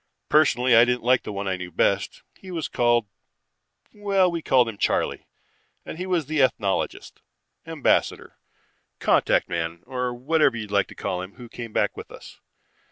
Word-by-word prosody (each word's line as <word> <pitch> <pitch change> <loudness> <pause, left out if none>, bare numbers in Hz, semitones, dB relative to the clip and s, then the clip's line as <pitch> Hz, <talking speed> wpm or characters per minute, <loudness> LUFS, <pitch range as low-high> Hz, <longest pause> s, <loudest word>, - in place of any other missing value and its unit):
Personally 130 -5 +4
I 115 - +8
didn't 125 -1 0
like 125 +1 +3
the - - -7
one 100 0 -4
I 95 -1 -1
knew 90 -1 -7
best. 100 +4 0
He 190 - -14
was 165 -6 -3
called 120 -2 +2 0.9
well, 195 -3 +1
we 170 -1 -3
called 130 -5 +3
him 110 -3 -7
Charley, - - -1 0.6
and 160 - -8
he 185 - -4
was 175 -5 0
the 155 0 0
ethnologist, 100 -7 -1 0.5
ambassador, - - 0 0.6
contact - - +2
man, 85 0 -4
or 125 -1 -3
whatever 135 +1 +1
you 110 - -4
like 100 -1 0
to - - -13
call 90 - -3
him, 95 +2 -9
who 125 -2 -11
came 115 0 -8
back - - 0
with - - -9
us. - - -13
120 Hz, 170 wpm, -24 LUFS, 100-155 Hz, 0.9 s, I